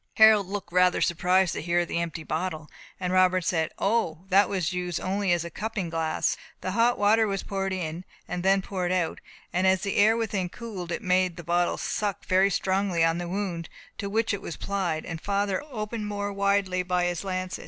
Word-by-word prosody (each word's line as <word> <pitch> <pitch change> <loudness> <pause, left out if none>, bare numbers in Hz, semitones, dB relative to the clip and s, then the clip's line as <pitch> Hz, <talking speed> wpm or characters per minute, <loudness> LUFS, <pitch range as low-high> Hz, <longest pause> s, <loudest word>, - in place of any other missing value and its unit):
Harold 220 -3 +7
looked 200 -2 -6
rather 180 0 +4
surprised 180 +1 +2
to - - -4
hear 175 +1 +1
of 175 - -3
the 170 - -1
empty 165 -1 -4
bottle, 155 -1 -3 0.3
and 180 -1 -2
Robert 185 -1 +4
said, 160 -2 +1
"O, 195 -5 0
that 195 +1 +5
was 185 -4 -1
used 180 -2 -2
only 195 0 0
as 170 -1 +1
a 170 - -7
cupping 210 -3 -3
glass. 165 -1 0 0.3
Hot 230 +6 +2
water 220 +2 +4
was 195 -1 -2
poured 195 -1 -2
in, 175 -2 -3 0.2
and 180 0 -3
then 195 +1 +3
poured 180 -2 -2
out, 180 -3 0 0.3
and 185 +2 +2
as 190 -1 +3
the 200 - -2
air 220 +3 +5
within 200 -5 -1
cooled, 190 -6 -7
it 230 - -3
made 185 -2 +2
the 175 - -7
bottle 175 +1 +1
suck 205 -3 -2
very 190 +1 +4
strongly 190 -3 +1
on 165 +1 +1
the 175 -1 -4
wound, 180 -4 -3 0.3
to 200 - -3
which 220 +1 +1
it 200 - -3
was 170 - -6
applied, 180 -6 -2
and 165 -2 -5
which - - -18
father 200 -1 0
had 300 - -11
opened 215 -2 -4
more 205 -1 -3
widely 200 -2 +1
by 180 0 0
his 175 0 -2
lancet. 185 -1 -3
185 Hz, 210 wpm, -27 LUFS, 175-200 Hz, 0.3 s, Harold